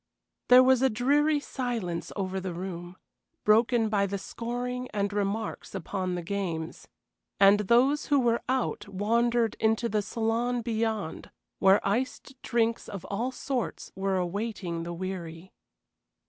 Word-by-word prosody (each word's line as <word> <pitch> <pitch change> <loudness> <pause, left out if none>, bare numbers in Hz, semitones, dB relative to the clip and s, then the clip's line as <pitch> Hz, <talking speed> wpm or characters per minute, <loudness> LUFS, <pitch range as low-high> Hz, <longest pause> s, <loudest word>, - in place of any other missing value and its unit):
There 250 +1 +9
was 260 -1 +4
a 265 - +4
dreary 290 +6 +2
silence 235 -12 -3
over 190 -1 -2
the 185 -2 -5
room, 175 0 -6 0.5
broken 225 +2 +4
by 200 -2 +1
the 200 +1 -3
scoring 245 +4 -4
and 200 -1 -1
remarks 205 +1 -3
upon 185 0 -3
the 175 - -4
games, 170 -4 -4 0.5
and 200 +1 +7
those 245 +8 +3
who 285 -2 +4
were 235 -2 +2
out 255 -5 -1
wandered 230 +3 +1
into 220 +2 +2
the 215 -2 0
saloon 230 +3 -1
beyond, 220 -6 -2 0.3
where 195 +1 +4
iced 255 +5 -2
drinks 230 -1 0
of 195 -4 -7
all 235 +6 -1
sorts 255 -1 -4
were 190 0 0
awaiting 185 -2 -3
the 170 +1 -5
weary. 175 -1 -6
215 Hz, 135 wpm, -28 LUFS, 190-240 Hz, 0.5 s, There